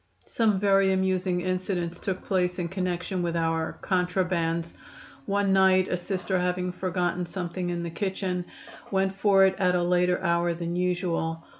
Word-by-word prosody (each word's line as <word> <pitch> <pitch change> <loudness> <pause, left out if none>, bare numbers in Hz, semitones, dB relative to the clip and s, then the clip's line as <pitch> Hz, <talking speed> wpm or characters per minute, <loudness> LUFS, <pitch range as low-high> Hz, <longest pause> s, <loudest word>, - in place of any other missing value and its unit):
Some 215 -4 +1
very 195 -1 +4
amusing 185 -1 0
incidents 180 -1 -2
took 190 -2 -3
place 180 -2 0
in 175 -2 -2
connection 185 0 -2
with 170 -1 -1
our 165 -1 -1
"contrabands." 180 -2 0 0.5
One 200 -1 +1
night 190 -1 +4
a - - +1
Sister, 185 +1 -2
having 180 0 -1
forgotten 180 -1 -2
something 175 0 -4
in 175 -1 -2
the 170 - -4
kitchen, 185 0 -2 0.4
went 190 -1 +1
for 195 -1 +4
it 190 - +3
at 180 -1 +3
a 175 - +1
later 180 0 +2
hour 170 -1 +1
than 170 0 -4
usual. 175 -2 -1
180 Hz, 155 wpm, -26 LUFS, 175-190 Hz, 0.5 s, very